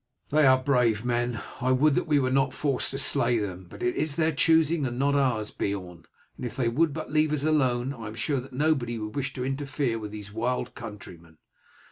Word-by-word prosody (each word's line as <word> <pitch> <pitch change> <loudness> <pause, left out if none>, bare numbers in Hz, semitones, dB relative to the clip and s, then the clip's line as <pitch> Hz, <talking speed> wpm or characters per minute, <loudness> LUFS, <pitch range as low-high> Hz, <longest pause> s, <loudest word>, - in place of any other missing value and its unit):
"They 150 -1 +5
are 130 0 +7
brave 125 -4 +1
men. 120 -1 0 0.2
I 130 +1 +2
would 140 +3 +4
that - - 0
we 150 -2 +3
were 130 -2 +1
not 135 0 +2
forced 140 -4 0
to 135 - -4
slay 120 -3 +1
them; 95 -4 -4
but - - -9
it 120 - +1
is 150 -1 -1
their 160 -1 +2
choosing 160 -1 +3
and 120 0 -5
not 140 +2 +2
ours, 125 -7 +1
Beorn, 90 -4 -4 0.3
and - - -9
if 120 -3 -4
they 125 -3 0
would 155 +6 +2
but 155 +1 -6
leave 155 0 +3
us 150 -2 -1
alone 135 -4 +1
I 115 -5 -8
am 110 - -7
sure 140 +3 -1
that 130 +2 -10
nobody 130 -4 0
would 105 -1 -6
wish 135 -2 -2
to 125 - -4
interfere 135 -3 -2
with 105 -1 -6
these 105 -1 -9
wild 125 +2 -2
countrymen." 90 -8 -10
130 Hz, 220 wpm, -27 LUFS, 115-145 Hz, 0.3 s, are